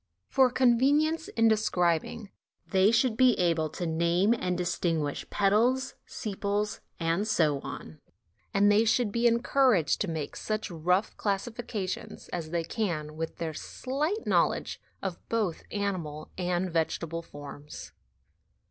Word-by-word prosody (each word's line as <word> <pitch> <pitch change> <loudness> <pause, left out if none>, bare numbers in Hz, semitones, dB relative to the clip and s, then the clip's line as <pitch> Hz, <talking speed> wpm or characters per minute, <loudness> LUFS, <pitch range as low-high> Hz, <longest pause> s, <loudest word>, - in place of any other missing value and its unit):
For 260 -1 +5
con 245 -2 +3
venience 310 +5 +2
in 225 0 +5
describing 195 -2 +1 0.3
they 190 0 +4
should 230 +1 +3
be 255 0 +5
able 165 -3 +1
to 175 - -5
name 170 +6 +2
and 180 -6 -1
distinguish 165 -5 -1
petals, 240 +7 +2
sepals, 205 0 -2 0.2
and 165 +5 0
so 160 -10 +2
on; 80 - -8 0.5
and 205 +1 +4
they 210 +2 +5
should 230 -1 +2
be 235 +3 +3
encouraged 235 - +3
to 205 - 0
make 160 -4 -4
such 215 -2 -3
rough 180 +5 0
classifica 210 0 -2
tions 185 - -6
as 165 -3 -4
they 170 0 -1
can 160 -5 -3
with 165 +1 -4
their 160 -2 -3
slight 295 - -3
knowledge - - +1 0.2
of 190 -3 -3
both 210 -7 0
animal 175 -7 -3
and 180 0 -1
vegetable 165 0 -1
forms. 145 -1 -10
195 Hz, 135 wpm, -29 LUFS, 165-225 Hz, 0.5 s, For